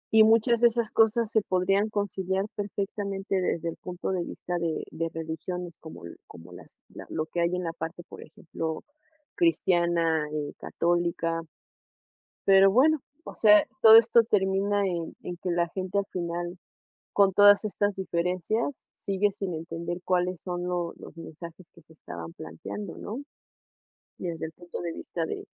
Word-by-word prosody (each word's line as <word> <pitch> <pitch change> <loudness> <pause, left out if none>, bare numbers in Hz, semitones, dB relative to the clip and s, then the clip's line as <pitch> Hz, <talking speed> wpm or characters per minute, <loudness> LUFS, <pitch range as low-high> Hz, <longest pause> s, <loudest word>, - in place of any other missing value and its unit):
Y 220 - +9
muchas 230 +2 +4
de 240 - +8
esas 235 -1 -1
cosas, 225 0 +3
se 220 - +3
podrían 195 +3 +1
conciliar 195 -2 -1
perfectamente 200 -1 -3
desde 170 -1 -1
el - - -7
punto 180 +1 -5
de 185 - -1
de 170 - -2
vista 175 -1 -4
de 165 -2 -2 0.3
religiones, 165 +2 -5
como 160 - -11 0.2
como 85 +2 -13
las 90 - -14 0.3
lo 155 - -2
que 170 +2 -3
hay 170 +1 +1
en 180 - -3
la 165 -1 -3
parte, 165 +1 -6
por - - -11
ejemplo, 160 0 -6 0.5
cristiana, 170 - +2
eh, 150 -1 -3
católica. 170 -1 -1 1.0
Pero 195 0 +7
bueno, 295 +7 +4 0.2
o - - -9
sea, 210 -1 +6 0.2
todo 220 0 +10
esto 230 0 +6
termina 200 -1 +1
en 170 -3 -3
en 175 -1 -5
que 180 - -4
la 170 -1 +1
gente 185 +2 -3
al 200 - -2
final, 175 0 -4 0.6
con 200 -1 +5
todas 205 +1 +7
estas 205 -1 0
diferencias, 185 - -2
sigue 200 +1 0
sin 195 -2 -4
entender, 165 +2 -5
cuáles 180 -1 0
son 175 -1 -4
lo 175 -1 -2
los - - -12
mensajes 165 +2 -10
que 170 - -18
se 160 - -20
estaban 85 - -9
planteando, 170 - -7
¿no?, 235 +7 -6 1.0
y 180 - -4
desde 165 -1 -3
el 160 - -10
punto 175 +2 -8
de 170 -1 -3
vista 165 0 -4
de - - -5
180 Hz, 160 wpm, -27 LUFS, 170-205 Hz, 1.0 s, todo